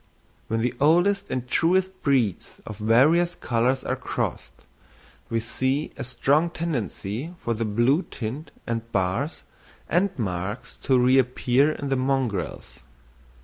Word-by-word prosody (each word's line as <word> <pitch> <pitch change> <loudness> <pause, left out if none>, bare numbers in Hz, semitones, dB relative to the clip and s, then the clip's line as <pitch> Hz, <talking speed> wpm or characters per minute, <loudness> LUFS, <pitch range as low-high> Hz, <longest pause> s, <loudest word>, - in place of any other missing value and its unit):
When 115 0 -1
the 125 +1 0
oldest 180 +7 +3
and 125 -1 -3
truest 185 +6 +1
breeds 125 - 0
of 105 - -8
various 150 +11 +4
colours 120 +3 0
are - - -1
crossed, - - -4 0.6
we 115 - 0
see 130 +6 -1
a 140 - -5
strong 140 +6 +2
tendency 150 - -4
for 115 - -1
the 115 +1 -2
blue 120 - +2
tint 130 +7 -5 0.2
and 115 0 -4
bars 100 - -1 0.4
and 190 +3 +2
marks 100 0 -4
to 130 - +2
reappear 130 +2 +3
in 140 -2 -5
the 135 - +1
mongrels. 130 -7 -2
130 Hz, 130 wpm, -25 LUFS, 115-155 Hz, 0.6 s, various